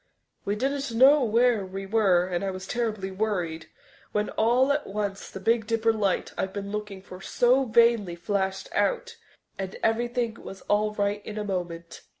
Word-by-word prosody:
We 205 - 0
didn't 275 +3 -2
know 275 +3 +7
where 235 -1 +3
we 195 +1 -6
were 195 -4 +3
and 180 0 -2
I 195 - -1
was 185 0 -6
terribly 215 -4 -2
worried, 185 -5 -2 0.5
when 210 0 0
all 245 +5 +3
at 290 +1 -1
once 200 -1 -4
the 190 - -8
Big 225 +2 +1
Dipper 225 0 +2
light 200 -4 -1
I'd 190 0 -2
been 200 0 -5
looking 210 -2 -5
for 185 -1 -11
so 250 +6 +2
vainly 230 -6 +3
flashed 190 +2 -2
out, 480 -1 0 0.4
and 190 -1 -4
everything 235 0 0
was 195 - -9
all 210 +1 0
right 205 0 -1
in 215 - -7
a 210 - -2
moment. 175 -4 -5
210 Hz, 170 wpm, -26 LUFS, 190-235 Hz, 0.5 s, know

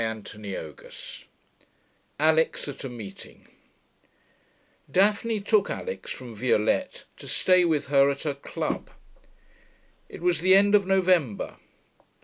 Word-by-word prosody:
CHAPTER 110 -2 -5
XV 95 -7 -9 0.9
ALIX 160 +1 +2
AT - - -11
A 135 - -4
MEETING 110 -5 -10
1 - - -25 1.4
Daphne 210 +3 +2
took 205 0 +2
Alix 475 0 -5
from 125 -3 -7
Violette 110 -1 0
to - - -11
stay 185 -1 +3
with 155 -4 +1
her 140 -1 +5
at 140 0 -3
her 150 - -1
club. 140 - -4 1.2
It - - -10
was 175 -1 +1
the 185 +1 +6
end 200 +1 +5
of 200 -2 +4
November. 180 - +1
160 Hz, 125 wpm, -26 LUFS, 120-190 Hz, 1.4 s, the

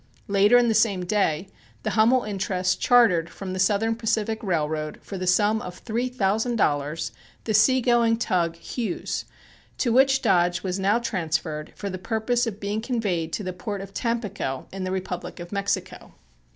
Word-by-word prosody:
Later 200 +4 +5
in 245 -1 +4
the 225 - +2
same 205 -4 +2
day 180 -3 0 0.4
the - - -1
Hummel 235 +3 +4
interests 190 -2 -1
chartered 210 -10 +4
from 185 +1 -7
the 185 - -4
Southern 210 +4 +2
Pacific 225 -1 -1
Railroad 155 -5 -1
for 200 - -7
the 185 -1 -3
sum 210 +4 +3
of 180 0 -7
three 240 +2 -2
thousand 220 0 0
dollars 150 -4 0 0.3
the 220 - -1
sea 255 +5 +5
going 235 -2 +3
tug 175 -7 0
Hughes, 210 +3 -4 0.5
to 240 -4 +1
which 270 +1 +4
Dodge 175 -1 +2
was 190 0 -2
now 200 +4 +3
transferred 160 -8 -2
for 200 - -5
the 185 - -5
purpose 230 +4 0
of 210 -2 -5
being 205 +1 -2
conveyed 205 -10 -1
to 210 - -2
the 185 -1 -4
port 200 +3 -5
of 195 0 -9
Tampico 210 - -2
in 190 -1 -4
the 185 - -3
Republic 185 -2 -4
of 175 0 -8
Mexico. 200 0 -3
200 Hz, 175 wpm, -25 LUFS, 180-225 Hz, 0.5 s, Later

